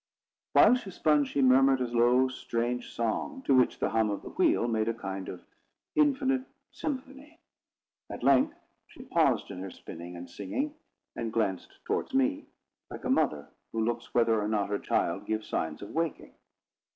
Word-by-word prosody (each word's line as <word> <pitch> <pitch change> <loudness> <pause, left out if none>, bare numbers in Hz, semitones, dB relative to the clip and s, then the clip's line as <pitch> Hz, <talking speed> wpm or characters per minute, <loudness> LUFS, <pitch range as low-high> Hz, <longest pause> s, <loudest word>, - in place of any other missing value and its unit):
While - - +7
she 235 -6 -8
spun, 150 -5 +2
she 135 +1 0
murmured 135 +1 +5
a 125 - 0
low 120 +2 +3
strange 120 -1 -3
song, 190 - -2
to 140 - +2
which 130 -1 +4
the - - -1
hum 110 -1 +2
of 100 - -3
the - - -8
wheel 120 - +2
made 110 -2 0
a 115 - 0
kind 95 -3 -5
of 90 - -9 0.5
infinite 270 -3 +2 0.3
symphony. 280 +3 -6 0.7
At - - -7
length 135 -1 +4 0.3
she - - -13
paused - - +1
in 95 - -7
her 95 +1 -5
spinning 85 0 -9
and 85 +1 -8
singing, 275 - -3 0.4
and - - -3
glanced - - -2
towards - - -2
me, 280 +2 +1 0.4
like - - -8
a - - 0
mother 140 - +1 0.2
who 110 -1 0
looks 120 0 -3
whether 115 -2 +3
or 105 - -1
not 105 -2 0
her 100 - -1
child - - -1
gives 110 0 -2
signs 80 +2 -3
of 100 - -8
waking. 165 -1 -3
120 Hz, 175 wpm, -29 LUFS, -, 0.7 s, While